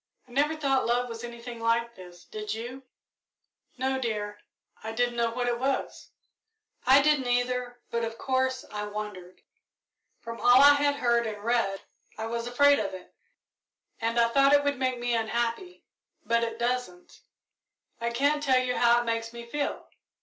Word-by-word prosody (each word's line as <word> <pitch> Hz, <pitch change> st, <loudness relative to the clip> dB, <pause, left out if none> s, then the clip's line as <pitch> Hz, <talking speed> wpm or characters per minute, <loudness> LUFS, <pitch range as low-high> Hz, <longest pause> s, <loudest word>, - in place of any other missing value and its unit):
"I -, -, -19 dB
never 290 Hz, +5 st, +1 dB
thought 275 Hz, -5 st, +1 dB
love 245 Hz, +1 st, +1 dB
was 230 Hz, 0 st, -7 dB
anything 235 Hz, 0 st, -8 dB
like 230 Hz, +1 st, 0 dB
this, 180 Hz, -4 st, -13 dB
did 215 Hz, 0 st, -5 dB
you?" 245 Hz, +4 st, -7 dB, 1.0 s
"No, 265 Hz, +1 st, -1 dB
dear 210 Hz, -4 st, -3 dB, 0.4 s
I 220 Hz, 0 st, -5 dB
didn't 240 Hz, +1 st, 0 dB
know 235 Hz, -1 st, +1 dB
what 245 Hz, +1 st, -2 dB
it 240 Hz, -1 st, 0 dB
was." 270 Hz, +1 st, -2 dB, 0.8 s
"I 275 Hz, +1 st, +7 dB
didn't, 295 Hz, -4 st, +2 dB
either, 245 Hz, 0 st, -1 dB
but, 235 Hz, 0 st, -1 dB
of 225 Hz, 0 st, -4 dB
course, 260 Hz, 0 st, -1 dB
I 210 Hz, 0 st, -4 dB
wondered. 205 Hz, -4 st, -7 dB, 0.8 s
From 230 Hz, 0 st, -8 dB
all 245 Hz, +1 st, +7 dB
I 285 Hz, +1 st, +9 dB
had 285 Hz, 0 st, +2 dB
heard 235 Hz, -3 st, +1 dB
and 210 Hz, -1 st, -6 dB
read 230 Hz, -4 st, 0 dB, 0.4 s
I 220 Hz, -, -4 dB
was 235 Hz, +1 st, -3 dB
afraid 285 Hz, +4 st, +4 dB
of 200 Hz, -3 st, -3 dB
it, 185 Hz, -, -13 dB, 0.9 s
and 230 Hz, +1 st, 0 dB
I 235 Hz, 0 st, +4 dB
thought 275 Hz, +3 st, +4 dB
it 285 Hz, 0 st, +5 dB
would 285 Hz, -2 st, -1 dB
make 255 Hz, -1 st, 0 dB
me 240 Hz, 0 st, -1 dB
unhappy, 235 Hz, +9 st, -2 dB, 0.4 s
but 235 Hz, 0 st, +2 dB
it 230 Hz, -1 st, -3 dB
doesn't. 235 Hz, -7 st, -3 dB, 0.8 s
I 235 Hz, 0 st, -1 dB
can't 285 Hz, +5 st, +1 dB
tell 265 Hz, -3 st, +3 dB
you 255 Hz, -1 st, 0 dB
how 240 Hz, 0 st, +4 dB
it -, -, -6 dB
makes 230 Hz, 0 st, -2 dB
me 235 Hz, 0 st, -9 dB
feel. 285 Hz, +4 st, -3 dB
240 Hz, 170 wpm, -27 LUFS, 230-260 Hz, 1.0 s, I